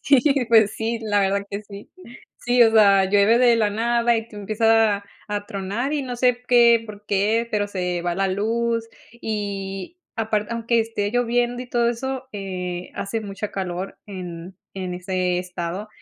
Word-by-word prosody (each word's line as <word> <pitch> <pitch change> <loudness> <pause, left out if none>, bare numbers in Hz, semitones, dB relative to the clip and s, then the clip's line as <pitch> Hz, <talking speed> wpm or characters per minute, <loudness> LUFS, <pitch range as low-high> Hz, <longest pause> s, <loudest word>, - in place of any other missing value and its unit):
Sí, 275 -3 +4 0.3
pues 220 -3 +5
sí, 225 +1 -2
la 205 -2 +1
verdad 200 +1 0
que 200 +1 -4
sí. 200 0 -12 0.5
Sí, 245 0 +3
o 225 - +6
sea, 200 -3 +6
llueve 205 +4 +4
de 240 -2 +5
la 215 -2 +2
nada 235 +2 +2
y 225 0 -4
tú 210 - -13
empieza 220 +1 +3
a 200 - -16 0.2
a 205 -1 -3
tronar 205 +9 -3
y 290 - -1
no 250 -2 -5
sé 245 0 +2
qué, 235 -2 +5
por 210 -1 -11
qué, 215 +4 +1
pero 205 -1 0
se 180 -3 -2
va 175 0 -1
la 195 +1 0
luz 230 +4 0 0.4
y 200 - -4 0.2
aparte 215 -1 -1
aunque 230 0 +1
esté 215 -2 -2
lloviendo 245 0 0
y - - -10
todo 240 -1 +1
eso, 260 +2 -4
eh, 180 -3 -5
hace 220 +3 -3
mucha 200 0 -5
calor 185 0 -4
en 180 -2 -8 0.2
en 185 -2 -4
ese 180 0 -1
estado. 180 +3 -5
210 Hz, 175 wpm, -23 LUFS, 195-235 Hz, 0.5 s, o